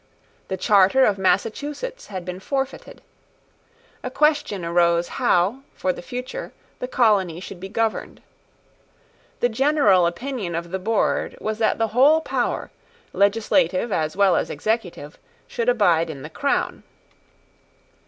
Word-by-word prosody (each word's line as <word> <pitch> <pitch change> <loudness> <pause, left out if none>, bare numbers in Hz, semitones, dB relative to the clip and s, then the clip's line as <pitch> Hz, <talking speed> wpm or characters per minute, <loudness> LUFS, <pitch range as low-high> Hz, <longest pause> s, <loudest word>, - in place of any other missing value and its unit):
The 190 - -3
charter 200 +7 +4
of 200 -2 +1
Massachusetts 290 - -1
had 185 -3 -6
been 180 0 -6
forfeited. 270 +5 -4 1.0
A - - -4
question 290 - +1
arose 170 0 +2
how, 185 +9 +1 0.2
for 185 - -1
the - - -9
future, 250 - -6 0.3
the 250 - -3
colony 205 -9 +2
should 185 0 -9
be 190 +2 -7
governed. 225 +1 -2 1.2
The 245 - +3
general 230 - +3
opinion 200 -1 -4
of 170 0 -5
the 190 - -2
board 220 +3 0
was 215 0 -3
that 220 - +2
the 225 -1 0
whole 275 +8 +5
power, - - -2 0.4
legislative 210 +2 +2
as 155 0 -1
well 200 -2 +4
as - - 0
executive, 185 -9 -3 0.3
should 235 +1 -1
abide 175 -9 +3
in 140 -4 -7
the 155 - -8
crown. 280 - -1
210 Hz, 135 wpm, -22 LUFS, 180-250 Hz, 1.2 s, whole